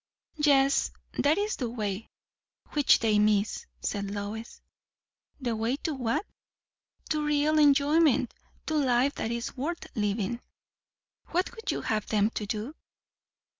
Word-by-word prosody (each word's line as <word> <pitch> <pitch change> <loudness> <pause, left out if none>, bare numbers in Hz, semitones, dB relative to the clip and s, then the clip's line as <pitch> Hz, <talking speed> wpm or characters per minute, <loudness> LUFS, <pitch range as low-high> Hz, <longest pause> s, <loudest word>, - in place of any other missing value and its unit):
"Yet 280 -2 +4 0.3
that 295 +4 +3
is 415 +1 -1
the 245 -3 -2
way, 215 -3 -3 0.6
which 290 -3 +4
they 215 -2 +2
miss," 210 0 +1
said 200 -1 -2
Lois. 205 +3 -6 0.8
"The 240 -4 -1
way 225 +4 0
to 315 - -1
what?" 250 - -1 0.8
"To 305 -1 0
real 300 +1 +2
enjoyment. 290 -1 +4 0.3
To 315 - -2
life 265 0 +3
that 220 - -3
is 235 0 -3
worth 325 +7 -3
living." 210 +2 -1 0.9
"What 360 +2 0
would 450 -3 -7
you - - -3
have 215 -2 -1
them 210 0 +2
do?" 215 +5 -3
245 Hz, 130 wpm, -28 LUFS, 215-295 Hz, 0.9 s, Yet